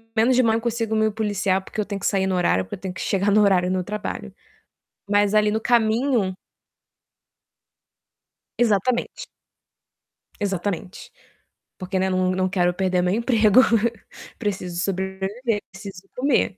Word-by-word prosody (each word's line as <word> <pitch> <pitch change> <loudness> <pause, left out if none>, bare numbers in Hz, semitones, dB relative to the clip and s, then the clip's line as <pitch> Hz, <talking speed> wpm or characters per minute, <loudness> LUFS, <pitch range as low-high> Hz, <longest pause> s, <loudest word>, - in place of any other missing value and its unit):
menos 235 +3 +3
de 255 - +4
manhã 225 0 +3
eu - - -4
consigo 230 -1 -1
me 220 0 +2
policiar, 200 -3 -1
porque 215 - -4
eu - - -3
tenho 200 0 -5
que - - -6
sair 190 -2 +1
no 190 - 0
horário, 135 - +2
porque - - -6
eu - - -15
tenho 190 -1 -5
que - - -7
chegar 200 +1 +1
no 215 - +5
horário 185 -2 +3
no 185 -1 -1
trabalho. 210 +3 -5 0.8
Mas 205 0 +2
ali 210 0 +4
no 220 +1 -1
caminho 230 -2 +1 2.2
Exatamente. 240 - 0 1.1
Exatamente, 195 -2 -4 0.7
porque 185 0 -4
né, 190 0 +1
não 185 0 +1
não 185 0 0
quero 180 -1 +1
perder 185 -1 0
meu 180 +1 +1
emprego, 230 0 +4 0.8
preciso 185 -5 -3
sobreviver, 195 +4 -2
preciso 195 -1 -10
comer. 255 -7 +1
200 Hz, 150 wpm, -23 LUFS, 185-220 Hz, 2.2 s, no